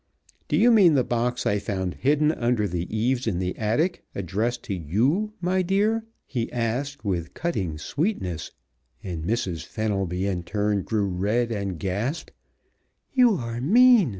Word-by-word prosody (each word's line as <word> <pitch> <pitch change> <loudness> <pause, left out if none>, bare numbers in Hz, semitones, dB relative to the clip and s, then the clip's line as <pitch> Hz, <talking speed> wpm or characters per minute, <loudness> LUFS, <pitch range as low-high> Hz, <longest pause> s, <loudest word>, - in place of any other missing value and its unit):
"Do - - +1
you 240 - +6
mean 190 -9 +6
the 130 - +4
box 120 +1 -1
I 100 - +2
found 95 -3 -3
hidden 150 +3 +2
under 120 -6 0
the 90 -1 -3
eaves 120 +3 0
in 100 -6 0
the 90 0 -2
attic, 120 - 0
addressed 105 +6 -2
to 100 - -4
you, 120 - 0
my 185 +1 +1
dear?" 210 +5 +1 0.2
he 120 -4 -3
asked 125 +4 -2
with 85 -4 -2
cutting 95 - -2
sweetness, 95 - -2 0.5
and 85 -4 -4
Mrs. 90 -4 -1
Fenelby, 95 -3 -2
in 95 -3 -1
turn, 105 +3 0
grew 105 +1 0
red 105 +6 0
and 100 -5 -3
gasped. 105 - -3 0.8
"You 250 -5 +5
are 115 -5 -4
mean!" 230 - +6
115 Hz, 150 wpm, -25 LUFS, 95-150 Hz, 0.8 s, you